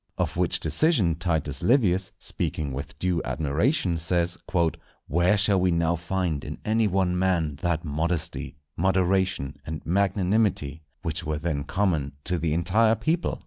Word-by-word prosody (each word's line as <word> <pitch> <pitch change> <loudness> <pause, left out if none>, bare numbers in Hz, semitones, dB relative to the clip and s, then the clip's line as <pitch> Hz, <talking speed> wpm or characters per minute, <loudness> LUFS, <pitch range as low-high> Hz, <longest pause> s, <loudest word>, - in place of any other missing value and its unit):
Of - - -1
which - - +1
decision 130 - +2
Titus 80 -4 -2
Livius, 95 -8 +2
speaking 70 -3 -3
with 70 +2 -6
due 90 0 0
admiration, 85 - 0
says, 85 +1 +1
"_Where 85 +2 0
shall 100 -1 +3
we 90 - +3
now 85 0 +2
find 90 -3 -2
in - - -6
any 110 0 +2
one 90 -2 +1
man, 85 -6 +1
that 85 +2 -1
modesty, 80 0 -2 0.2
moderation, 95 -4 +1
and 80 0 -6
magnanimity 95 -4 +1 0.2
which 80 +1 -2
were 75 -1 -2
then 75 -3 -2
common 80 -6 0
to 90 -1 -1
the 80 -1 0
entire 100 +8 +3
people? 160 - -1
85 Hz, 145 wpm, -26 LUFS, 80-95 Hz, 0.2 s, shall